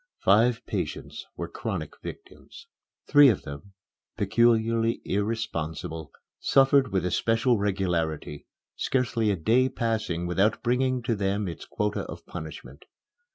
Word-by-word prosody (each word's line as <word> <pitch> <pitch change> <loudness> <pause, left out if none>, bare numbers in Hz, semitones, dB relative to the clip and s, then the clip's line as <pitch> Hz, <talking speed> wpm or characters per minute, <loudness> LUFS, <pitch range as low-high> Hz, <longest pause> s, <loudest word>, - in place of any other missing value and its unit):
Five 115 +4 +4
patients - - -4
were - - -4
chronic - - -4
victims. 405 +3 -11 0.4
Three 145 -1 +7
of 105 - 0
them, 70 +8 -9 0.4
peculiarly 115 0 +2
irresponsible, 85 -7 -3 0.3
suffered 135 0 +4
with 95 -2 0
especial 115 +5 +2
regularity, 85 -7 -2 0.3
scarcely 120 -4 0
a 100 - +2
day 120 +10 +2
passing 110 -9 -2
without 95 +5 +1
bringing 125 +1 +1
to 115 -1 0
them 100 0 -1
its 85 - -7
quota 105 0 -1
of - - -9
punishment. - - -9
110 Hz, 115 wpm, -27 LUFS, 90-120 Hz, 0.4 s, Three